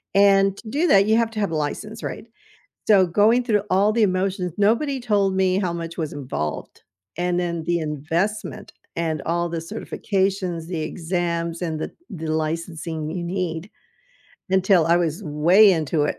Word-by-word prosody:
and 195 -1 +5
to 220 - -10
do 300 +9 +1
that, 200 -8 +5
you 220 +1 +3
have 230 -1 +1
to 220 - -5
have 200 -5 0
a - - -2
license, 210 +9 -4
right? - - -5 0.6
So, 195 -4 +5
going 215 +8 +3
through 210 -4 +1
all 195 +3 +3
the 230 +1 +2
emotions, 185 -2 0
nobody 235 +7 +1
told 205 -5 +1
me 190 0 +2
how 185 -3 -1
much 170 0 -6
was 155 -3 -3
involved, 125 - -5 0.4
and 175 0 0
then 170 -2 -3
the 175 +1 +1
investment, 165 +8 -3 0.2
and 160 -2 -1
all 170 +1 0
the 170 0 -3
certifications, 190 -1 -2
the 170 -2 -4
exams, 170 0 -2
and 160 -3 -2
the - - -4 0.2
the 165 -5 -6
licensing 160 0 -3
you 175 +2 -4
need, 175 0 -3 0.8
until 190 -3 +4
I 170 +1 +4
was 170 +2 -1
way 175 +8 +5
into 160 -2 0
it. - - -2
180 Hz, 170 wpm, -23 LUFS, 165-200 Hz, 0.8 s, and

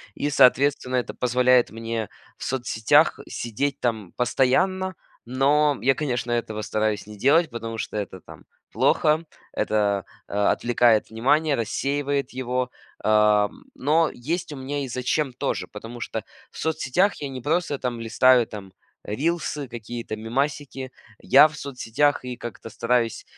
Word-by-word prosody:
И, 145 - -1
соответственно, 130 -1 +4
это 125 - -1
позволяет 125 0 +3
мне 115 -1 -4 0.3
в - - -9
соцсетях 120 -4 +2
сидеть 130 +5 -3
там 110 -6 -2
постоянно. 185 +10 +1 0.3
Но 140 +3 +3
я, 135 +1 +3
конечно, 125 -4 -2
этого 110 -2 -2
стараюсь 105 -1 -1
не 105 0 -10
делать, 150 - +4
потому 115 -1 -6
что - - -4
это, 95 -3 -5
там, - - -14 0.3
плохо, 155 +2 +2 0.3
это, 100 -2 0 0.2
а, 100 0 +2
отвлекает 120 -2 +2
внимание, 140 +7 +2
рассеивает 140 +3 -1
его, 125 0 -2 0.3
а, 105 -1 +4
м, - - -18
но 155 +2 +2
есть 155 +6 -3
у - - -7
меня 140 +2 -3
и - - -4
зачем 130 +2 -1
тоже. 135 +2 -2
Потому 115 +3 -9
что 110 -2 -4 0.3
в - - -14
соцсетях 160 +5 +1
я 140 - -3
не 130 -1 -7
просто, 150 0 0
там, 120 -2 -3
листаю, 120 +2 +4
там, 100 -3 -10 0.3
рилсы, 150 +4 -2
какие-то 120 -1 -6
мемасики, 135 +3 -3 0.3
я 140 +3 +7
в 155 - -12
соцсетях 140 0 -1
и 125 -1 -5
как-то 115 -1 -8
стараюсь 115 +1 0
125 Hz, 145 wpm, -24 LUFS, 115-145 Hz, 0.3 s, я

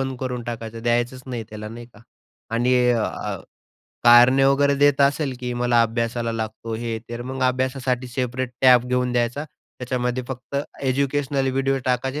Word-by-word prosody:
बंद 135 -1 -3
करून 125 -2 -3
टाकायचं 115 -1 -6
द्यायचंच 120 +2 0
नाही 120 -3 -4
त्याला 105 0 -7
नाही 120 +1 -9
का 120 - -20 0.5
आणि 125 +2 +2 0.2
अ, 115 -2 -2 0.7
कारणे 125 +3 +7
वगैरे 140 +1 +3
देत 145 0 +3
असेल 140 -1 +2
की 125 -1 -3
मला 120 -1 +2
अभ्यासाला 115 0 -1
लागतो 110 0 -5
हे, 115 0 -3
तर 120 0 -5
मग 130 +1 -5
अभ्यासासाठी 130 0 0
सेपरेट 125 0 -3
टॅब 125 -2 +6
घेऊन 125 0 0
द्यायचा. 120 +5 0 0.4
त्याच्यामध्ये 125 0 -2
फक्त 130 +2 -6 0.3
एज्युकेशनल 135 0 0
व्हिडिओ 135 +1 0
टाकायचे 130 +3 -1
125 Hz, 150 wpm, -22 LUFS, 120-130 Hz, 0.7 s, कारणे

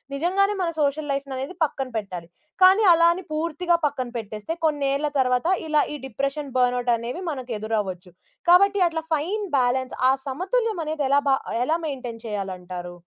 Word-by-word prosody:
నిజంగానే 390 +7 +1
మన 335 - 0
social 290 +1 0
life 275 0 -2
అనేది 275 +8 -5
పక్కన 270 -2 -4
పెట్టాలి. 180 -5 -8 0.4
కానీ 385 +4 +7
అలా 335 0 +5
అని 375 - -7
పూర్తిగా 335 +2 0
పక్కన 265 -4 -1
పెట్టేస్తే 215 +7 -5
కొన్నేళ్ల 290 -1 +1
తర్వాత 250 +5 +1 0.2
ఇలా 305 -1 +3
ఈ - - -4
డిప్రెషన్, 275 0 -3
బర్న్‌ఔట్ 245 -1 +2
అనేవి 245 +11 -5
మనకు 255 -3 -6
ఎదురవ్వొచ్చు. 195 -5 -3 0.4
కాబట్టి 395 +3 +6
అట్లా 325 -1 -3
ఫైన్ 370 +8 -1
బ్యాలన్స్ 255 +1 0
ఆ - - +6
సమతుల్యమనేది 335 - -1
ఎలా 280 +1 +5
బ - - +4 0.3
ఎలా 320 +4 +1
మెయింటైన్ 245 -5 -6
చేయాలంటారు? 180 -3 -5
275 Hz, 150 wpm, -24 LUFS, 245-330 Hz, 0.4 s, కానీ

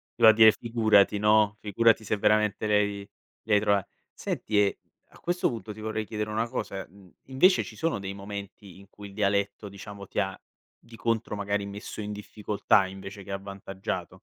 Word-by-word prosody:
Doveva 110 -1 +7
dire: 110 -1 +8
"Figurati", 110 -3 +3
no, 105 0 +4
"Figurati 110 +2 +3
se 105 0 -1
veramente 105 +1 +2
lei 105 -1 +1 0.4
li 110 - 0
hai 105 - +6
trova" 100 -2 +2 0.3
senti 105 -1 -3
e, 100 -1 +2 0.3
a - - -19
questo 175 +1 0
punto, 115 -3 -6
ti 110 - -13
vorrei 110 0 -3
chiedere 105 0 -4
una 110 +2 -1
cosa, 100 -6 -4
mhmm, 95 0 -19
invece, 180 +9 +4
ci - - -10
sono 165 -10 -1
dei 100 0 -5
momenti 100 -1 -9
in 100 - -16
cui 105 -1 -11
il - - -15
dialetto, 100 0 0
diciamo, 100 0 -10
ti - - -3
ha, 95 -1 -1 0.4
di 115 -1 -15
contro, 115 -2 -1
magari, 100 0 -2
messo 100 +2 -7
in 105 0 -5
difficoltà 105 -1 +1
invece 100 +1 -9
che 100 - -9
avvantaggiato? 95 -2 -5
105 Hz, 180 wpm, -27 LUFS, 100-110 Hz, 0.4 s, dire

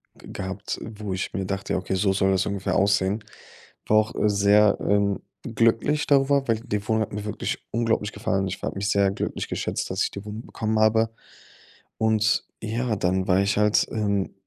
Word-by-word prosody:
g - - -15
gehabt, 95 +2 -5
wo 105 -2 -6
ich 95 +1 -3
mir 95 - -2
dachte: 100 +1 -3
„Ja, - - +1
okay, 95 +1 -3
so 95 +1 +2
soll 95 0 +2
das 95 0 +1
ungefähr 100 -1 -2
aussehen.“ 100 +1 +2 0.6
War 110 - +4
auch 110 0 +2
sehr, 100 0 +4
ähm, 100 -1 +1 0.2
glücklich 115 +5 +1
darüber, 140 -1 +3
weil 115 -2 +1
die 105 -3 -4
Wohnung 110 -1 +2
hat 110 - -3
mir 105 0 -4
wirklich 105 - -4
unglaublich 115 -2 0
gefallen. 100 -3 -1
Ich 95 - -5
war - - -2
habe - - -8
mich 100 +1 -1
sehr 100 -1 +3
glücklich 100 - -3
geschätzt, - - -3
dass - - 0
ich - - -1
die 100 - -7
Wohnung 105 +2 -7
bekommen 110 0 -2
habe. 110 +1 +3 0.9
Und 110 -1 +2 0.2
ja, 115 +1 -1
dann 95 -1 0
war 95 0 +4
ich 100 +1 +1
halt, 105 0 +3
ähm, 100 -3 -1
105 Hz, 195 wpm, -25 LUFS, 100-110 Hz, 0.9 s, War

